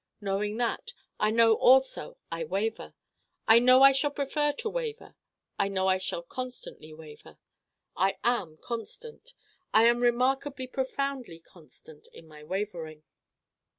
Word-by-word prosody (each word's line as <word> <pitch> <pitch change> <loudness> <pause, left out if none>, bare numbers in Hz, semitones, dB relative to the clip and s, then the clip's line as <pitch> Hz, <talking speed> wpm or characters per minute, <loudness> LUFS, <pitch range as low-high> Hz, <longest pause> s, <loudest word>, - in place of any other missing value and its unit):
Knowing 205 +1 -2
that, 245 - -2 0.3
I 215 - +2
know 225 0 +5
also 260 -7 +3
I 165 0 -3
Waver: 200 +7 -3 0.5
I 225 +1 +8
know 255 +2 +6
I 275 - +9
shall 275 +2 +1
prefer 290 +1 -1
to 465 +6 -5
Waver: 465 -1 -5 0.4
I 200 - +2
know 190 -1 -1
I 190 0 +2
shall 175 -2 -4
constantly 250 -7 -8
Waver. 155 -1 -14 0.6
I 190 +2 +1
am 200 -10 -1
constant 455 - -9 0.4
I 220 - +7
am 235 +1 +4
remarkably 260 +3 0
profoundly 265 -6 -4
constant 160 -2 -16
in 165 - -14
my 150 -1 -14
Wavering. 165 -4 -5
230 Hz, 135 wpm, -28 LUFS, 185-265 Hz, 0.6 s, I